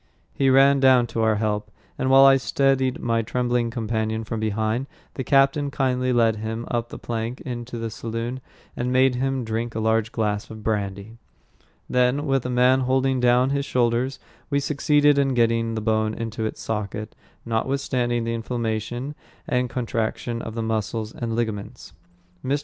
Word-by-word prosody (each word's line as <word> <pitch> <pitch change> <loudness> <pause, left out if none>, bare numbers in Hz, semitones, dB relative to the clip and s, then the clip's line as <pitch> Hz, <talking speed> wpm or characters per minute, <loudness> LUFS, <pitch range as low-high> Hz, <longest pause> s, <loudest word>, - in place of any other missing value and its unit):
He 135 -1 +2
ran 135 +1 +5
down 130 -2 +5
to 115 - 0
our 110 -1 +3
help, 105 -1 -1 0.3
and 130 - -1
while 135 +1 +8
I 135 0 +7
steadied 135 -1 +1
my 115 -1 +1
trembling 120 +1 0
companion 110 -1 -2
from 110 0 -4
behind, 110 +4 -1 0.3
the 130 - -4
captain 140 +2 +3
kindly 130 -2 0
led 115 -3 +3
him 110 +2 -4
up 120 -1 -1
the - - -8
plank 115 +1 -4
into 120 -1 -6
the 115 -1 -4
saloon, 115 +3 -4 0.3
and 125 +1 -2
made 130 0 +4
him 135 +1 -1
drink 115 +1 -3
a - - -1
large 110 0 +1
glass 105 -3 -2
of 110 -1 -9
brandy. 100 +1 -3 0.7
Then, 125 +3 +2
with 135 -3 +1
a - - -4
man 125 +1 +4
holding 130 0 +1
down 125 +2 +3
his 140 0 0
shoulders, 125 +1 0 0.3
we 140 -1 +2
succeeded 145 0 +3
in 135 -2 +1
getting 115 -1 +1
the 110 - -2
bone 110 0 0
into 115 -1 -3
its - - -7
socket, 105 0 -4 0.3
notwithstanding 120 0 -1
the 115 0 -2
inflammation 115 +3 -3 0.3
and 125 0 0
contraction 115 -1 -2
of 115 - -7
the 115 - -2
muscles 110 0 -2
and 115 -2 -3
ligaments. 110 -4 -4 0.5
Mr. 140 +3 0
120 Hz, 165 wpm, -23 LUFS, 110-130 Hz, 0.7 s, while